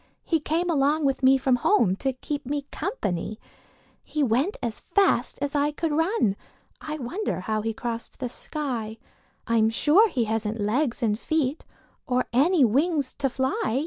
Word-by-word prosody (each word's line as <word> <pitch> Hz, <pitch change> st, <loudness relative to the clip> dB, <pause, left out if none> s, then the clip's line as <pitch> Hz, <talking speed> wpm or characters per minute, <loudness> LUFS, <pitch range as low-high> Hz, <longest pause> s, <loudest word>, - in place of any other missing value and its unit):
He 325 Hz, -, +1 dB
came 325 Hz, +4 st, -1 dB
along 300 Hz, -1 st, +2 dB
with 270 Hz, 0 st, +1 dB
me 265 Hz, +1 st, +6 dB
from 260 Hz, -1 st, +2 dB
home 235 Hz, -, +3 dB
To 270 Hz, +3 st, 0 dB
keep 285 Hz, +3 st, -5 dB
me 285 Hz, +1 st, -2 dB
company. 215 Hz, -, -3 dB, 0.6 s
He 300 Hz, -1 st, -1 dB
went 265 Hz, -, +1 dB
as 230 Hz, -3 st, -3 dB
fast 395 Hz, +3 st, +1 dB
as 285 Hz, 0 st, -2 dB
I 290 Hz, 0 st, +2 dB
could 320 Hz, +1 st, -2 dB
run; 320 Hz, -, +1 dB, 0.5 s
I 305 Hz, 0 st, -5 dB
wonder 295 Hz, -, -3 dB
how 215 Hz, +3 st, -1 dB
he 225 Hz, +1 st, -1 dB
crossed 235 Hz, 0 st, -5 dB
the 250 Hz, -, -2 dB
sky? 240 Hz, -5 st, -4 dB, 0.5 s
I'm 225 Hz, -2 st, +3 dB
sure 315 Hz, -, +4 dB
he 250 Hz, -9 st, 0 dB
hasn't 220 Hz, 0 st, -2 dB
legs 240 Hz, +5 st, 0 dB
and 215 Hz, -1 st, +1 dB
feet 305 Hz, 0 st, -1 dB, 0.4 s
Or 250 Hz, 0 st, +1 dB
any 295 Hz, +3 st, +4 dB
wings 285 Hz, +4 st, +1 dB
to 275 Hz, -1 st, +1 dB
fly. 260 Hz, -2 st, -1 dB
270 Hz, 165 wpm, -25 LUFS, 230-305 Hz, 0.6 s, me